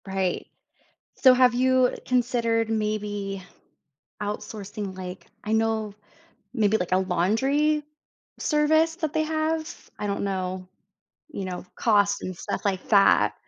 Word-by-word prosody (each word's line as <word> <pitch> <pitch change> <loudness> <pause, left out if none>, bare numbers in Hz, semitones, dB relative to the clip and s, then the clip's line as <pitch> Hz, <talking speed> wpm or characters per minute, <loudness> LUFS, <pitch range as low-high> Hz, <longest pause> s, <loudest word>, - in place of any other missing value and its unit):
Right, 190 -2 -1 0.7
so, 260 -2 +6
have 250 -1 +5
you 255 0 +3
considered, 230 -2 +1
maybe, 205 -3 -2 0.8
outsourcing, 205 -1 -5
like 185 0 -8 0.2
I 215 - -3
know, 220 -2 0 0.6
maybe, 220 -3 +2
like, 180 -4 -4
a 185 - +5
laundry 265 - +1 0.6
service 315 +2 +2
that 315 -4 -2
they 315 - +2
have? 315 0 -2
I 210 - -3
don't 200 0 -2
know, 185 -1 -3 0.6
you 200 -10 -5
know, 180 -1 -5
cost 205 -3 +2
and 185 - -5
stuff - - -4
like 190 -2 -1
that. 200 -2 +5
215 Hz, 125 wpm, -25 LUFS, 195-260 Hz, 0.8 s, so